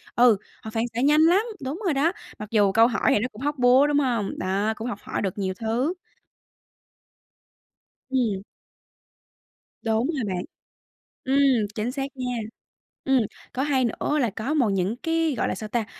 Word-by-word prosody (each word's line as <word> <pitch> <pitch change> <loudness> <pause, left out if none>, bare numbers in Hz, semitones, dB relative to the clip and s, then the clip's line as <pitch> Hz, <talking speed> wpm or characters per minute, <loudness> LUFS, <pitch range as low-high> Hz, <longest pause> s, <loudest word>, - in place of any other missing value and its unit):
Ừ, 240 -4 +6 0.3
họ 220 - -6
phản 225 +1 0
xạ 240 - 0
nhanh 295 +3 +5
lắm, 345 +5 +5 0.2
đúng 275 +7 -4
rồi 345 - +2
đó, 290 +5 +2 0.3
mặc 210 -1 -7
dù 205 -3 +4
câu 225 +3 +5
hỏi 245 - -3
thì - - +3
nó 235 - -1
cũng 215 - -12
hóc 290 +1 -1
búa, 255 +3 +6
đúng 290 0 +2
hông? 235 -7 -1
Đó, 195 +4 0
cũng 225 +3 -5
học 205 -4 -4
hỏi - - -4
được 195 0 -3
nhiều 190 -1 -1
thứ. 240 +8 0 2.2
Ừm. 230 -7 0 1.4
Đúng 225 +2 +1
rồi 295 -7 -2
bạn. 180 - -3 0.8
Ừm, 265 -5 +3
chính 225 +3 -2
xác 270 0 -3
nha. 250 -1 -2 0.7
Ừm, 270 -2 +3 0.3
có 260 - -1
hay 270 -3 +2
nữa 290 +5 -1
là 245 -5 +2
có 220 +8 -3
một 265 -8 +2
những 195 +2 0
cái, 325 +1 0
gọi - - 0
là, - - -2
sao 215 +2 -7
ta? 230 -1 -1
245 Hz, 180 wpm, -25 LUFS, 215-275 Hz, 2.2 s, Ừ